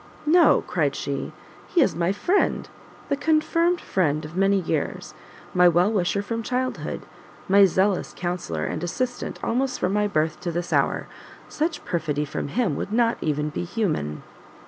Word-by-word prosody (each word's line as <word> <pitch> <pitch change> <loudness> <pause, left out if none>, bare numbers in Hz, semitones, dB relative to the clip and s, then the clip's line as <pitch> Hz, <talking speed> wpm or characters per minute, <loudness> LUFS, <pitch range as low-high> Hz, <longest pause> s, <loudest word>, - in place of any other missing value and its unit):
"No," 330 +1 +5
cried 150 -6 0
she, 140 -1 -3 0.4
"he 360 - +1
is - - +2
my 170 +2 +1
friend, 355 - +1 0.4
the 285 - +1
confirmed 335 +4 +2
friend 155 -4 0
of 155 +3 -9
many 195 +1 +3
years, 160 -4 -3 0.4
my 180 0 +6
well 175 +4 +4
wisher 200 -1 0
from 230 +2 -3
childhood, 255 +2 -2 0.5
my 200 +1 +7
zealous 190 +1 +1
counsellor 175 - -3
and 155 - -3
assistant 245 +8 -3
almost 255 +2 0
from 180 - 0
my 210 0 +2
birth 155 -5 0
to 175 - -3
this 175 +1 -3
hour: - - +1 0.4
such 315 +1 -2
perfidy 150 -3 -1
from 140 - -4
him 190 - 0
would 200 - -4
not 230 +1 +2
even 150 -1 -1
be 150 - -4
human!" 170 - -2
190 Hz, 160 wpm, -24 LUFS, 160-240 Hz, 0.5 s, my